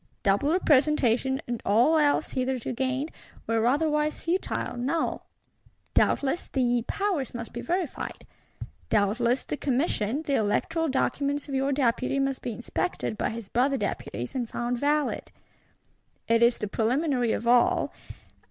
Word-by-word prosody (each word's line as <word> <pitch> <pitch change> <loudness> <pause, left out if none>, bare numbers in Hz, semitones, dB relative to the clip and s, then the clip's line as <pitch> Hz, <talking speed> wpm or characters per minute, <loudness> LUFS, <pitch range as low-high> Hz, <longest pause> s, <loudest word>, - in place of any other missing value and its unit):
Double 200 +10 +2
representation, 270 -6 +3
and 240 -1 -3
all 235 +10 +4
else 295 -2 +2
hitherto 255 -2 -2
gained, 265 +4 -1 0.3
were 225 0 +1
otherwise 300 +2 +1
futile, 345 -6 -1
null. 275 +7 -2 0.7
Doubtless, 280 +5 +2
the 245 -3 +1
"powers 370 -12 -1
must 230 -1 -6
be - - -4
verified;"—doubtless, 245 - -2
the 300 - -4
Commission, 265 -1 0
the 285 - -2
electoral 320 +9 +1
Documents 280 +2 0
of 280 - -6
your 270 +1 +1
Deputy 255 0 +1
must 275 -1 0
be 245 - -3
inspected 240 +2 -3
by - - -1
his 225 -2 -6
brother 265 +6 +1
Deputies, 195 - -4
and 245 -3 -2
found 240 0 -2
valid: 295 +1 0 1.0
it 230 0 +3
is 235 +1 +5
the 210 - -3
preliminary 245 +3 +1
of - - -2
all. 240 0 +3
260 Hz, 135 wpm, -27 LUFS, 235-290 Hz, 1.0 s, is